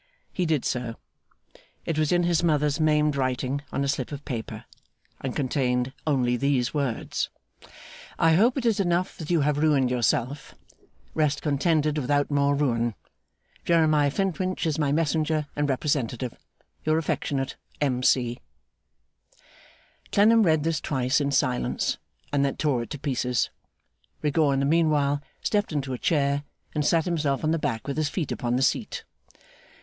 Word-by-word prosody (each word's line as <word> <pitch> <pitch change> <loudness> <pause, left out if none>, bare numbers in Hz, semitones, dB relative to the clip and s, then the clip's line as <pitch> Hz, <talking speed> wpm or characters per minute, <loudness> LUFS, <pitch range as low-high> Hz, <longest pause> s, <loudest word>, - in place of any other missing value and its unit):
He 180 -2 0
did 155 -5 +1
so. 120 -2 -2 0.9
It 165 - -1
was 155 -1 +1
in 175 0 +3
his 170 -2 +2
mother's 150 -3 +2
maimed 150 -1 +3
writing, 130 +1 -1
on 140 - -1
a - - -1
slip 135 -1 -2
of 145 0 -7
paper, 115 -6 -5 0.5
and 130 -2 -4
contained 130 -2 0
only 125 -4 +2
these 135 -2 +1
words: 140 -6 -2 0.9
'I 165 -1 +4
hope 230 - +4
it 255 - -2
is 225 -3 +2
enough 175 -1 0
that 160 - -6
you 170 -3 +3
have 145 0 +1
ruined 145 -5 +3
yourself. 125 +3 -1 0.6
Rest 150 -2 0
contented 150 0 +1
without 145 +2 +1
more 140 0 +2
ruin. 120 -5 0 0.7
Jeremiah 155 -4 +3
Flintwinch 185 +3 -1
is 160 -1 0
my 145 -2 +1
messenger 155 0 +1
and 145 0 0
representative. 130 -3 -1 0.5
Your 155 +1 +2
affectionate 140 -4 -2 0.2
M. 130 -4 0
C.' 120 -2 +2 1.7
Clennam 225 +3 +5
read 160 -6 +3
this 160 -1 0
twice, 130 +1 +1
in 140 - 0
silence, 130 -2 0 0.3
and 140 -1 +3
then 140 - -1
tore 140 -6 +1
it 120 - -7
to 150 - -5
pieces. 125 -3 -1 0.7
Rigaud 150 0 +2
in 135 - +1
the - - +1
meanwhile 145 -2 +2 0.2
stepped 210 -2 0
into 135 -3 -2
a 125 - -4
chair, 140 -3 +1 0.3
and 150 - 0
sat 165 +2 +2
himself 150 -6 0
on 155 - +2
the 165 - +1
back 110 -6 -2
with 140 - -3
his 155 -2 +1
feet 165 -3 -3
upon 120 0 -1
the 130 - +1
seat. - - -1
145 Hz, 155 wpm, -26 LUFS, 130-155 Hz, 1.7 s, Clennam